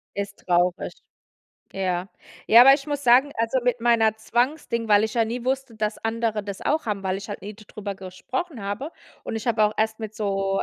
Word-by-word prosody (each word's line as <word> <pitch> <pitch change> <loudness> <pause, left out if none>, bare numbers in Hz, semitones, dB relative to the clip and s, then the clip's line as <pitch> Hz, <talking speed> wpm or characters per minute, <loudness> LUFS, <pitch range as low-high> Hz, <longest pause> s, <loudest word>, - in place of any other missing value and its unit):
Ist 200 0 -4
traurig. 180 0 +1 0.8
Ja. 185 -1 -2 0.4
Ja, 230 +2 +9
aber 270 +2 +9
ich 275 0 -5
muss 290 -1 -3
sagen, 255 +4 +5
also 230 +3 +1
mit 245 -1 0
meiner 225 -2 +3
Zwangsding, 235 0 -1
weil 205 0 +5
ich 220 - -4
ja 230 -2 +3
nie 235 +2 -4
wusste, 265 -2 -2
dass 215 0 -2
andere 225 -1 -1
das 200 -1 -7
auch 310 +2 0
haben, 205 -2 -2
weil 190 0 0
ich 200 +2 -8
halt 205 - -6
nie 205 +2 -7
darüber 205 -1 -7
gesprochen 225 - -5
habe. 205 +10 -4 0.3
Und - - -4
ich 225 - -6
habe 230 -2 +2
auch 210 0 +3
erst 220 +1 0
mit 220 -1 -6
so 195 -2 -1
220 Hz, 205 wpm, -24 LUFS, 200-240 Hz, 0.8 s, Ja